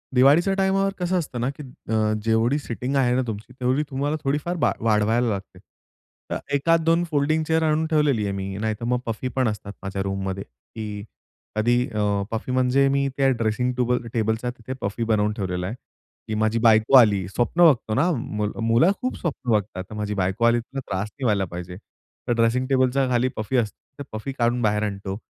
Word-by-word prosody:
दिवाळीच्या 150 Hz, +9 st, +5 dB
टाईमवर 195 Hz, 0 st, +2 dB
कसं 180 Hz, +1 st, 0 dB
असतं 130 Hz, -6 st, -5 dB
ना, 125 Hz, -, 0 dB
की 145 Hz, +1 st, -8 dB, 0.3 s
अ, 110 Hz, -1 st, +2 dB
जेवढी 115 Hz, +5 st, +2 dB
सिटिंग 125 Hz, +1 st, -4 dB
आहे 125 Hz, -2 st, +3 dB
ना 130 Hz, -, +2 dB
तुमची, 110 Hz, +3 st, -6 dB
तेवढी 130 Hz, +4 st, +1 dB
तुम्हाला 145 Hz, +3 st, -1 dB
थोडीफार 150 Hz, +6 st, -1 dB
बा -, -, +2 dB
वाढवायला 110 Hz, +2 st, +2 dB
लागते. 100 Hz, -2 st, -5 dB, 0.7 s
तर -, -, -1 dB, 0.2 s
एखाद 165 Hz, +3 st, +3 dB
2 165 Hz, +1 st, +3 dB
फोल्डिंग 155 Hz, +1 st, +1 dB
चेअर 160 Hz, 0 st, +2 dB
आणून 155 Hz, 0 st, +2 dB
ठेवलेली 150 Hz, -8 st, +2 dB
आहे 100 Hz, -, -1 dB
मी, 95 Hz, 0 st, -4 dB
नाहीतर 110 Hz, +1 st, -2 dB
मग 125 Hz, 0 st, +1 dB
पफी 115 Hz, +2 st, -3 dB
पण 130 Hz, -3 st, +2 dB
असतात 105 Hz, -1 st, -4 dB
माझ्या 95 Hz, 0 st, -3 dB
रूममध्ये, 95 Hz, 0 st, -3 dB
की 105 Hz, -, -8 dB, 0.5 s
कधी 120 Hz, +3 st, +2 dB
अ, 110 Hz, -2 st, -4 dB, 0.3 s
पफी 115 Hz, +3 st, -3 dB
म्हणजे 130 Hz, +2 st, +3 dB
मी 140 Hz, 0 st, +1 dB
त्या 135 Hz, -1 st, +3 dB
ड्रेसिंग 125 Hz, +1 st, 0 dB
टूबल 125 Hz, 0 st, +1 dB
अ, -, -, -7 dB
टेबलचा 110 Hz, +1 st, 0 dB
तिथे 125 Hz, +1 st, -7 dB
पफी 100 Hz, +4 st, -2 dB
बनवून 105 Hz, -1 st, +1 dB
ठेवलेला 90 Hz, -3 st, -3 dB
आहे 110 Hz, -, -4 dB, 0.5 s
की 110 Hz, -, -3 dB
माझी 110 Hz, +1 st, +1 dB
बायको 110 Hz, +3 st, +5 dB
आली 100 Hz, -6 st, +4 dB
स्वप्न 125 Hz, -, +2 dB
बघतो 120 Hz, -8 st, +3 dB
ना, 160 Hz, +7 st, +3 dB, 0.5 s
मुलं 115 Hz, +11 st, +4 dB
खूप 255 Hz, -, -2 dB
स्वप्न 135 Hz, -7 st, -3 dB
बघतात. 100 Hz, -3 st, 0 dB
तर -, -, -9 dB
माझी 105 Hz, 0 st, -3 dB
बायको 95 Hz, +4 st, 0 dB
आली, 120 Hz, 0 st, +4 dB
तिला 135 Hz, +4 st, -7 dB
त्रास 95 Hz, +3 st, -2 dB
नाही 135 Hz, -, -10 dB
व्हायला 100 Hz, -4 st, +2 dB
पाहिजे. 90 Hz, +1 st, -7 dB, 0.5 s
तर 120 Hz, -, +2 dB
ड्रेसिंग 120 Hz, +3 st, +1 dB
टेबलच्या 130 Hz, 0 st, +2 dB
खाली 125 Hz, +1 st, +2 dB
पफी 110 Hz, +4 st, -1 dB
असते, 110 Hz, -4 st, -1 dB, 0.2 s
तर -, -, -4 dB
पफी 110 Hz, +5 st, -4 dB
काढून 120 Hz, +1 st, +2 dB
बाहेर 105 Hz, -1 st, +1 dB
आणतो. 100 Hz, -1 st, -4 dB
120 Hz, 190 wpm, -24 LUFS, 105-135 Hz, 0.7 s, दिवाळीच्या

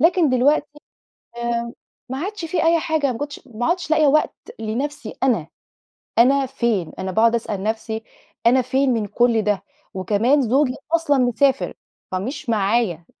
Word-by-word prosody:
لكن 340 Hz, 0 st, +4 dB
دلوقتي 290 Hz, +3 st, +1 dB, 0.6 s
آمم 235 Hz, 0 st, -2 dB, 0.4 s
ما 260 Hz, +1 st, -4 dB
عادش 390 Hz, +2 st, -4 dB
في 330 Hz, +2 st, -1 dB
أي 335 Hz, 0 st, +5 dB
حاجة، 305 Hz, -5 st, 0 dB
ما 225 Hz, -, -7 dB
كنتش 290 Hz, 0 st, -5 dB
ما 240 Hz, -1 st, -4 dB
عدْتش 345 Hz, -1 st, -1 dB
لاقية 310 Hz, -1 st, +4 dB
وقت 305 Hz, +2 st, +3 dB, 0.2 s
لنفْسي 270 Hz, +7 st, -4 dB
أنا، 235 Hz, -12 st, +2 dB, 0.7 s
أنا 270 Hz, +3 st, +5 dB
فين؟ 235 Hz, -9 st, -1 dB
أنا 190 Hz, 0 st, -3 dB
باقعد 230 Hz, +4 st, +3 dB
أسأل 210 Hz, -4 st, -3 dB
نفْسي، 220 Hz, +1 st, -3 dB, 0.4 s
"أنا 255 Hz, +2 st, +5 dB
فين 260 Hz, +1 st, +1 dB
من 215 Hz, -3 st, -1 dB
كُل 235 Hz, +1 st, +2 dB
ده؟" 205 Hz, -1 st, 0 dB, 0.3 s
وكمان 215 Hz, +9 st, +2 dB
زوجي 255 Hz, +2 st, +2 dB, 0.2 s
أصلًا 310 Hz, -4 st, +2 dB
مسافر، 255 Hz, +2 st, +2 dB, 0.4 s
فمش 235 Hz, +8 st, -4 dB
معايا 200 Hz, -5 st, +1 dB
250 Hz, 150 wpm, -21 LUFS, 220-290 Hz, 0.7 s, أي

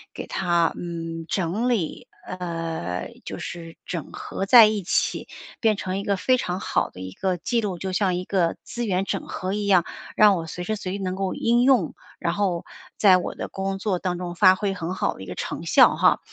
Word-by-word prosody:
给 -, -, -5 dB
它 175 Hz, -3 st, +1 dB
嗯， 165 Hz, -1 st, -5 dB
整 195 Hz, +7 st, 0 dB
理， 205 Hz, -10 st, -2 dB, 0.2 s
呃， 165 Hz, -, -4 dB
就 -, -, -6 dB
是 165 Hz, -1 st, -7 dB
整 170 Hz, -5 st, -5 dB
合 195 Hz, -, -4 dB
在 235 Hz, -1 st, +10 dB
一 215 Hz, -1 st, 0 dB
起， 180 Hz, -, 0 dB, 0.3 s
变 220 Hz, -3 st, +2 dB
成 185 Hz, 0 st, -3 dB
一 -, -, -4 dB
个 200 Hz, -1 st, 0 dB
非 255 Hz, +7 st, +3 dB
常 180 Hz, -6 st, -2 dB
好 -, -, 0 dB
的 90 Hz, -, -11 dB
一 95 Hz, 0 st, -6 dB
个 185 Hz, -, -1 dB
记 230 Hz, +7 st, 0 dB
录， 190 Hz, -4 st, -3 dB
就 190 Hz, +2 st, -4 dB
像 185 Hz, -1 st, +1 dB
一 180 Hz, -, -2 dB
个 180 Hz, -4 st, +1 dB
资 240 Hz, 0 st, -4 dB
源 190 Hz, -1 st, 0 dB
整 -, -, -3 dB
合 185 Hz, 0 st, -3 dB
一 205 Hz, 0 st, -2 dB
样， 185 Hz, -4 st, +4 dB, 0.3 s
让 210 Hz, -2 st, +6 dB
我 165 Hz, -2 st, -4 dB
随 180 Hz, +3 st, -6 dB
时 215 Hz, +4 st, -1 dB
随 185 Hz, -3 st, -5 dB
地 -, -, -2 dB
能 185 Hz, 0 st, -2 dB
够 190 Hz, -1 st, -2 dB
应 240 Hz, +1 st, +2 dB
用， 250 Hz, -, +3 dB, 0.2 s
然 170 Hz, -1 st, -1 dB
后 185 Hz, -4 st, -1 dB, 0.3 s
在 190 Hz, -3 st, +6 dB
我 180 Hz, -, -4 dB
的 -, -, -5 dB
工 195 Hz, 0 st, -3 dB
作 195 Hz, -2 st, -1 dB
当 180 Hz, -1 st, -2 dB
中 175 Hz, -1 st, -5 dB
发 185 Hz, +1 st, +6 dB
挥 195 Hz, 0 st, -1 dB
很 180 Hz, -1 st, -4 dB
好 -, -, 0 dB
的 -, -, -13 dB
一 95 Hz, -, -8 dB
个 -, -, -6 dB
成 -, -, -5 dB
效 -, -, +6 dB
哈， -, -, +4 dB
185 Hz, 235 characters per minute, -24 LUFS, 170-200 Hz, 0.3 s, 在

